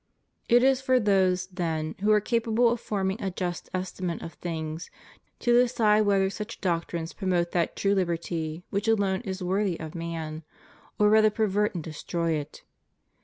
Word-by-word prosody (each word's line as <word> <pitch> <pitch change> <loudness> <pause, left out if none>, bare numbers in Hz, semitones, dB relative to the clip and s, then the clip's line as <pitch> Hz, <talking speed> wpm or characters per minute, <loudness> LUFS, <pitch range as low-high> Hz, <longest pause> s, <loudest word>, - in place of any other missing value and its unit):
It 240 +1 +6
is 265 0 +4
for 260 -1 +3
those, 190 -4 +2
then, 165 -4 -3
who 210 +2 +2
are 210 - +6
capable 230 +2 +2
of 240 - -1
forming 195 +1 -2
a 195 - -1
just 180 -1 -4
estimate 185 -2 -3
of 165 - -7
things 160 -1 -5 0.5
to 240 - +3
decide 225 -4 +4
whether 195 -1 +3
such 210 +2 -6
doctrines 170 -2 -2
promote 180 -3 0
that 170 -2 0
true 200 0 +1
Uberty 170 -3 -2
which 200 +2 -1
alone 200 -3 +2
is 190 -4 -5
worthy 190 -1 0
of 160 -1 -7
man, 165 -2 -5 0.6
or 210 - +4
rather 215 0 +6
pervert 210 -1 0
and 170 - -3
destroy 165 +2 -3
it. 150 -1 -4
190 Hz, 165 wpm, -27 LUFS, 170-210 Hz, 0.6 s, It